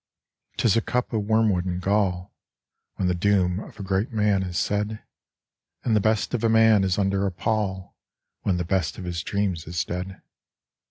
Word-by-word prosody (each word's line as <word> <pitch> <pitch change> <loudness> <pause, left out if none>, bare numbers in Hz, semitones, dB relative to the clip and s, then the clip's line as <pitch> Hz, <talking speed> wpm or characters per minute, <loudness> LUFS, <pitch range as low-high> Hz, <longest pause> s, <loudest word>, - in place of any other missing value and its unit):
'Tis 115 - +3
a 115 - +3
cup 125 +2 -2
of 105 -2 0
wormwood 110 -4 +2
and 90 -1 -2
gall, 95 -1 0 0.6
When 95 - -1
the 90 - +2
doom 90 0 +2
of 110 - -11
a - - -4
great 95 +4 -1
man 105 -3 +2
is 90 -2 -3
said; 105 +1 -1 0.8
And 115 - +2
the - - +5
best 110 +3 0
of 120 -2 -1
a 115 - +3
man 110 -2 +5
is 95 -1 +1
under 100 0 +1
a - - -2
pall 95 -1 -2 0.5
When 95 -3 0
the 90 - -2
best 85 -3 -1
of - - -7
his 85 -2 -3
dreams 95 -5 -2
is 85 +1 -2
dead. 90 +2 -6
100 Hz, 185 wpm, -25 LUFS, 90-105 Hz, 0.8 s, the